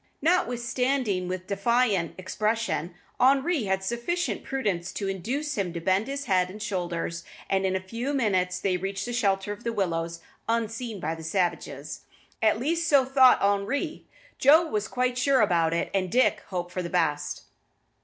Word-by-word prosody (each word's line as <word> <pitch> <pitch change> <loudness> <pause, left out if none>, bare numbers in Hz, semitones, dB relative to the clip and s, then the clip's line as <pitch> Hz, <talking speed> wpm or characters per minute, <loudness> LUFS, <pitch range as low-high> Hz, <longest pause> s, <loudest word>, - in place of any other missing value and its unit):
Notwithstanding 250 - +1
his 185 0 -3
defiant 200 -1 +1
expression, 210 -2 -1 0.2
Henri 275 +1 +3
had 190 0 0
sufficient 240 - -2
prudence 205 -11 -2
to 200 - -3
induce 255 - -2
him 185 -3 -1
to 170 - -3
bend 190 +5 +1
his 280 +1 -4
head 185 -5 +2
and 205 +3 -9
shoulders, 175 -4 -3 0.3
and 190 0 +2
in 190 - 0
a - - +1
few 230 +8 -4
minutes 190 -9 +1
they 185 -2 0
reached 195 +2 -3
the 240 - -4
shelter 200 -4 +1
of 210 +3 -13
the 235 - -1
willows 170 -5 -2 0.3
unseen 230 -1 -2
by 160 -1 -2
the 165 0 -8
savages. 175 +2 -2 0.4
At 220 -1 +4
least 330 +6 0
so 280 -3 +5
thought 260 -3 +5
Henri, 205 - 0 0.3
Joe 310 +5 +6
was 215 -9 -2
not - - -10
quite 250 0 0
sure 265 0 +4
about 170 -5 +3
it, 170 - -1
and 185 -2 0
Dick 255 +2 +3
hoped 175 -2 -4
for 185 - -3
the 170 - -4
best. 150 -4 0
205 Hz, 170 wpm, -27 LUFS, 185-250 Hz, 0.4 s, Joe